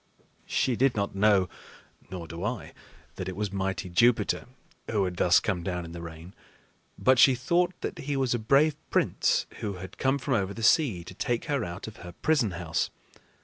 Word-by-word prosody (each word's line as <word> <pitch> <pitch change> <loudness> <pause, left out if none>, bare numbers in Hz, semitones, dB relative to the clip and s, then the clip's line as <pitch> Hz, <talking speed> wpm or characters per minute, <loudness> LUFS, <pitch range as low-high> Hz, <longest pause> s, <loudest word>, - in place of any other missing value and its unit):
She 130 - +1
did 130 +1 +2
not 100 -1 -1
know 100 -1 +4 0.6
nor 90 -3 -6
do 85 +2 -7
I 115 +2 -4 0.4
that 95 - -4
it 95 - -6
was 105 -1 -2
mighty 95 -1 -2
Jupiter 115 +9 +2 0.4
who 105 -3 +1
had 90 -1 -4
thus 90 -1 +5
come 95 -5 -2
down 90 -1 -3
in 85 - -9
the 85 0 -7
rain; 85 +2 -9 0.6
but 130 -1 +4
she 130 +2 +7
thought 170 +8 0
that - - -4
he 140 0 -2
was 130 -2 +1
a 120 - 0
brave 140 +7 +3
prince - - +2
who 105 -2 -3
had 95 0 -9
come 135 +1 +2
from 140 0 -2
over 100 -3 0
the 115 - -6
sea 120 - +3
to 90 - -10
take 120 - -2
her 140 -6 0
out 90 +2 -6
of 110 +1 -9
her 90 -4 -10
prison 140 - +1
house. 80 -2 -1
105 Hz, 195 wpm, -28 LUFS, 90-130 Hz, 0.6 s, she